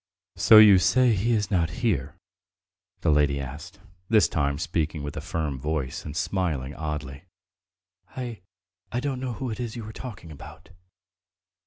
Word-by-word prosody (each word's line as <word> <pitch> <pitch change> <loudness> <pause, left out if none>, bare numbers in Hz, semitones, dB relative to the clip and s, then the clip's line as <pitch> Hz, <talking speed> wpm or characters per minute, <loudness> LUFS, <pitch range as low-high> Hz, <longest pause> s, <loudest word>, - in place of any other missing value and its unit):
"So 110 - +7
you 105 -3 +9
say 120 +4 +3
he 110 +4 +1
is 105 -2 0
not 85 -4 +2 0.2
here?" 75 - -1 0.8
the 80 - +2
lady 75 -1 +2
asked, 75 +9 -8 0.3
this 110 -2 +5
time 70 -2 -1
speaking 80 -1 -2
with 75 - -6
a - - -4
firm 75 -5 -3
voice 75 -2 -3
and 75 +1 -6
smiling 85 -7 -2
oddly. 75 -1 -6 0.9
"I... 120 -6 -6 0.5
I 120 - -1
don't 135 -1 -3
know 130 -2 -3
who 130 +1 -4
it 110 - -6
is 120 -2 -4
you 115 -2 -6
are 110 - -9
asking 95 -10 -8
about." 75 - -12
85 Hz, 160 wpm, -26 LUFS, 75-110 Hz, 0.9 s, you